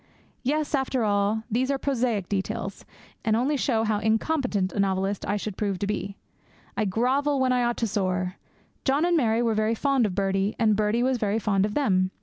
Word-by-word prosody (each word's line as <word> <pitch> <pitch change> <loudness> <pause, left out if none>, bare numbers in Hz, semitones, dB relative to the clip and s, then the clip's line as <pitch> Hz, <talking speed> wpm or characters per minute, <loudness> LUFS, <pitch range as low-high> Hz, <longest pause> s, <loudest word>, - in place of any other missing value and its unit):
Yes, 300 +4 -1
after 265 -3 0
all, 205 +1 +1
these 255 +4 +1
are 275 - +1
prosaic 245 -8 -1
details, 195 0 -3 0.4
and 220 -1 +2
only 260 +6 +1
show 235 -5 +1
how 215 -2 +1
incompetent 220 - 0
a - - -3
novelist 195 0 0
I 205 +1 0
should 205 -1 -5
prove 200 -3 -1
to 200 - -2
be. 200 -1 -3 0.6
I 215 - 0
grovel 265 +8 +1
when 260 -1 +2
I 250 -1 +2
ought 240 0 0
to 230 - 0
soar. 185 -2 -1 0.5
John 285 +4 +2
and 350 0 +2
Mary 235 -6 +2
were 230 -1 +2
very 215 +1 +1
fond 270 -2 +2
of 185 - -5
Birdie, 195 +1 0
and 220 -3 +3
Birdie 215 +3 +1
was 255 -1 +1
very 210 0 0
fond 205 -2 +1
of 210 - -7
them. 185 -10 +2
220 Hz, 200 wpm, -26 LUFS, 200-255 Hz, 0.6 s, and